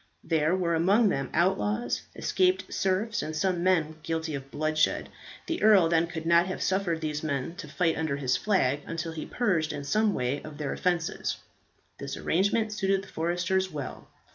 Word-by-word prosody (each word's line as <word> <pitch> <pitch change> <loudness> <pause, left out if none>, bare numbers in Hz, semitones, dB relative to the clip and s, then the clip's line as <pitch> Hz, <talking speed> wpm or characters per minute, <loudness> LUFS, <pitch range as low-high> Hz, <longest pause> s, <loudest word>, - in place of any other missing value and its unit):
There 160 +1 +2
were 175 -2 0
among 200 +7 +4
them 135 -7 -1
outlaws, 195 +6 +1
escaped 370 0 +1
serfs, 195 +3 0
and 155 - -4
some 175 +2 0
men 165 -4 +1
guilty 160 0 -3
of 135 -1 -6
bloodshed. 155 +2 0 0.4
The 330 - -3
earl 205 -6 +6
then 165 0 +3
could 165 -1 -6
not 170 +2 +4
have 185 - -3
suffered 185 -4 0
these 150 -1 -2
men 140 -1 -2
to 205 - -7
fight 165 -3 +1
under 160 -3 -1
his 130 -2 +1
flag 145 -6 +1
until 165 0 -4
purged 180 -10 0
in 145 - -5
some 210 +9 +1
way 125 +3 -1
of 155 -1 -10
their 150 -2 -3
offences. 175 -3 -1 0.6
This - - -5
arrangement 210 +5 +1
suited 195 -2 0
the 190 - -13
foresters 175 +3 0
well. 145 -4 -6
170 Hz, 170 wpm, -28 LUFS, 155-190 Hz, 0.6 s, earl